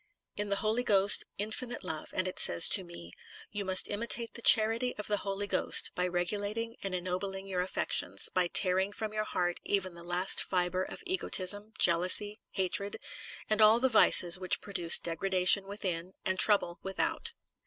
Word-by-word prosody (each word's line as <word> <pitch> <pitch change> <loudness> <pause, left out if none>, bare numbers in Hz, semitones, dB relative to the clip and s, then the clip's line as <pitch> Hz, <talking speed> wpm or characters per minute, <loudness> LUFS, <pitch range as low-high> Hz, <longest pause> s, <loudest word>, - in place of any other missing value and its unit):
In 205 0 -5
the 200 - -1
Holy 220 +3 -1
Ghost, 200 -4 +5
infinite 220 +4 -5
love, 160 -4 -6
and 185 0 -2
it 185 - -6
says 85 - +5
to 190 - +4
me: 130 - -13 0.4
You 205 -1 -5
must 190 -1 +2
imitate 230 +2 -1
the 235 - -11
charity 225 +3 +4
of 210 - -7
the 210 - -2
Holy 195 +1 -5
Ghost, 200 - +2
by 180 0 -3
regulating 205 +6 -4
and 195 -2 -5
enno 180 0 -4
bling 195 0 -7
your 185 -2 -4
affections, 185 - -2
by 180 -1 0
tearing 190 +2 +2
from 215 0 -7
your 215 0 -3
heart 175 -3 -3
even 190 -3 -3
the 170 - -14
last 180 +2 +1
fibre 180 0 -2
of - - -8
egotism, 210 - 0
jealousy, 185 +5 +2
hatred, 200 +1 -3 0.5
and 215 0 -1
all 215 +2 +5
the 260 +1 0
vices 185 -5 +5
which 185 -1 0
produce 175 -5 +2
degradation 185 +3 +1
within, 185 -3 -6
and 190 -1 -2
trouble 195 -5 +3
without. 190 0 -4
195 Hz, 175 wpm, -29 LUFS, 180-210 Hz, 0.5 s, Ghost